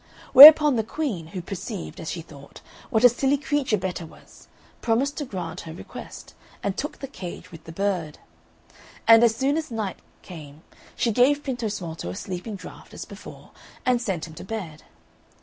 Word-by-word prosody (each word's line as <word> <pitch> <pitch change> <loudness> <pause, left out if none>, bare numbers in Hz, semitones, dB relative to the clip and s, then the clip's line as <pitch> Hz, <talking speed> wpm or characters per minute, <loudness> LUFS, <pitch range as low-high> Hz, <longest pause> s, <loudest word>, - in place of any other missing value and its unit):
Whereupon 295 0 +11
the 220 - 0
Queen, 220 - -4
who 180 +1 -7
perceived, 195 +1 -7
as 160 - -6
she 170 - -5
thought, 140 -3 -15 0.3
what 220 +1 +1
a - - +11
silly 270 +4 +1
creature 285 -6 -1
Betta 185 -2 -4
was, 160 - -16 0.3
promised 255 +5 0
to 290 - -3
grant 190 -8 -6
her 160 - -9
request, 170 - -11 0.3
and 200 -1 -2
took 295 +7 -5
the 275 - -7
cage 185 -9 -9
with 165 -2 -13
the 165 - -9
bird. 180 -4 -2 0.9
And 225 0 +8
as 230 -2 +4
soon 275 +5 0
as 315 -2 -4
night 220 -5 -4 0.2
came 155 -3 -12 0.3
she 235 - 0
gave 275 +6 +3
Pintosmalto 205 - -5
a 90 - -6
sleeping 185 - -6
draught 190 - -12
as - - -7
before, - - -13 0.3
and 250 -1 +2
sent 190 -9 -3
him 160 - -12
to - - -10
bed. 185 -7 -7
210 Hz, 175 wpm, -24 LUFS, 170-255 Hz, 0.9 s, Whereupon